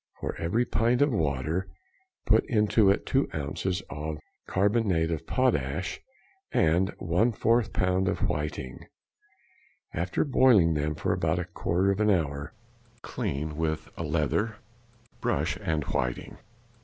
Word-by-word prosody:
For - - -4
every 90 +9 +1
pint 120 +4 +2
of 145 - +2
water 80 - -1 0.6
put - - +4
into 105 -1 +3
it 100 - +1
2 135 +1 +1
ounces 90 +6 -2
of 75 +2 -5 0.3
carbonate 95 -4 +1
of 80 -2 -4
potash 90 - 0 0.5
and 85 +4 +3
a - - -7
1/4 115 +5 +1
lb. 95 0 +1
of - - 0
whiting. 75 -4 -4 1.1
After 90 - -1
boiling 120 - +5
them 75 0 -1
for - - 0
about - - 0
a - - -2
quarter 95 +4 0
of 100 - -2
an 105 0 +3
hour, 70 -7 0 0.5
clean 75 +2 -3
with 80 0 -2
a - - -6
leather, 85 +8 0 0.6
brush, - - 0
and 80 -2 -1
whiting. 60 -2 -3
90 Hz, 130 wpm, -28 LUFS, 75-105 Hz, 1.1 s, boiling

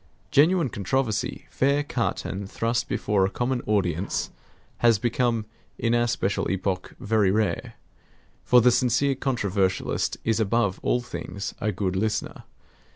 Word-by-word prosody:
Genuine 160 +1 +4
controversy, 110 +2 -1
fair 140 +2 +2
cut 125 -5 -2
and 100 0 -5
thrust 115 +3 -1
before 105 -2 +1
a 95 - +2
common 125 +3 -1
audience, 95 -3 0 0.5
has 115 -2 +4
become 120 0 0 0.3
in 115 0 0
our 120 0 +3
special 100 -4 -1
epoch 95 0 -2
very 105 -2 +2
rare. 105 +1 -1 0.7
For 125 -1 +6
the 125 +2 +5
sincere 125 +3 +2
controversialist 100 -8 -1
is 115 0 +1
above 105 -2 +1
all 125 - +1
things 100 -4 -6
a 105 - +1
good 95 -1 -2
listener. 105 +2 -2
110 Hz, 135 wpm, -25 LUFS, 100-125 Hz, 0.7 s, For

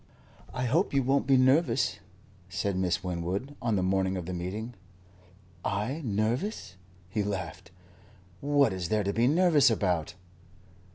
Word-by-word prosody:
"I 125 0 -2
hope 150 - +1
you 135 - +3
won't 135 +2 +1
be 135 -1 +5
nervous," 130 +6 +3 0.5
said 100 +1 -2
Miss 90 -2 0
Winwood, 90 +10 -3
on 115 -3 +1
the 95 - +1
morning 95 0 +1
of 90 - -5
the 90 - -5
meeting. 100 +7 -4 0.9
"I 120 +10 -2
nervous?" 115 - -2 0.3
He 100 +3 -2
laughed. 95 -3 -4 0.7
"What 140 -6 +3
is 90 -3 -4
there 105 -1 +1
to 100 +1 -1
be 115 +3 +3
nervous 155 -3 +5
about?" 90 -7 0
105 Hz, 145 wpm, -29 LUFS, 95-135 Hz, 0.9 s, be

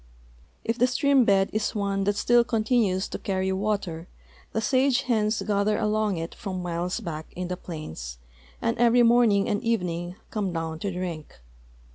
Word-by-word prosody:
If 230 +2 -2
the 250 - +5
stream 270 0 +3
bed 195 -2 +3
is 215 0 -1
one 200 -1 0
that 205 0 +1
still 240 +3 +4
con 225 -2 -1
tinues 210 -6 +2
to - - -4
carry 190 -1 -1
water, 190 -4 -2 0.4
the - - -1
sage 255 +3 +2
hens 220 -3 +1
gather 205 0 +1
along 210 -2 0
it 165 +1 -5
from 185 -3 -5
miles 175 +3 -2
back 160 -7 -6
in 180 0 -4
the 180 - -1
plains, 80 - -7 0.5
and 115 - +1
every 240 0 +5
morning 230 -4 +4
and 205 - -1
evening 180 -6 -1 0.2
come 205 -4 -1
down 165 -1 -4
to 200 +3 -2
driidc. 175 -4 -4
200 Hz, 170 wpm, -26 LUFS, 180-225 Hz, 0.5 s, the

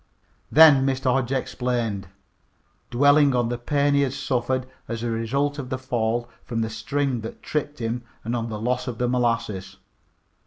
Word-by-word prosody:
Then 150 -4 +8
Mr. 135 -1 +1
Hodge 130 -1 0
explained, 120 -6 -2 0.8
dwelling 145 +2 +4
on 120 -2 +1
the 120 - -2
pain 145 +3 +1
he 140 - +4
had 135 -2 0
suffered 130 0 -1 0.2
as 115 0 -4
a 120 - -1
result 140 +6 -1
of 130 -3 -6
the 130 - -2
fall 120 -2 -1 0.2
from 115 -1 -3
the 110 0 -2
string 135 +2 -1
that 110 - -8
tripped 150 -1 -2
him 115 +1 -2 0.2
and 115 +2 -2
on 115 -1 -2
the 110 -1 -5
loss 125 +3 -1
of 120 -3 -4
the 125 - 0
molasses. 115 -6 -1
125 Hz, 170 wpm, -24 LUFS, 115-135 Hz, 0.8 s, Then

